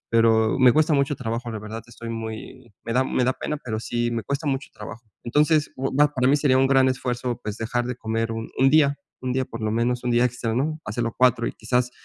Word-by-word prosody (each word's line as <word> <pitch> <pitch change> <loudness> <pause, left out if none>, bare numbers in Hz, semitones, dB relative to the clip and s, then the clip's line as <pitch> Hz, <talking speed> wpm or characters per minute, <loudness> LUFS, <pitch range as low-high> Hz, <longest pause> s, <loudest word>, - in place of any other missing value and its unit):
pero, 115 0 +3
me 130 -2 +7
cuesta 155 0 +3
mucho 140 0 +1
trabajo. 115 0 -4
La 110 - -4
verdad, 110 +2 -7
estoy 115 -1 -9
muy 115 +2 -7
me 115 - -3
da 130 +2 +3
me 130 -1 0
da 130 - +2
pena, 150 - -4
pero, 110 -3 -3
sí 120 0 -1
me 115 -1 -2
cuesta 140 +2 -3
mucho 135 0 -1
trabajo. 110 +2 -10 0.2
Entonces, 150 +4 +2
oh, 135 +1 -2
va, 150 0 +5
para 130 -1 +2
mí 145 - +5
sería 140 -3 +3
un 135 - +4
gran 135 -1 +4
esfuerzo, 125 -1 -2
pues, 105 0 -4
dejar 120 +2 -2
de 125 -1 -4
comer 115 0 -2
1, 115 0 -5 0.2
día 145 -1 +4 0.3
1, 125 - -1
día, 130 +1 0
por 115 -2 -8
lo 110 - 0
menos 120 +2 0
un 125 - 0
día 120 +1 +3
extra, 120 -2 -1
no 155 +5 -1
hacerlo 115 +2 -3
4, 125 -2 +3
y - - -2
quizás, 125 +2 -1
125 Hz, 240 wpm, -24 LUFS, 115-135 Hz, 0.3 s, me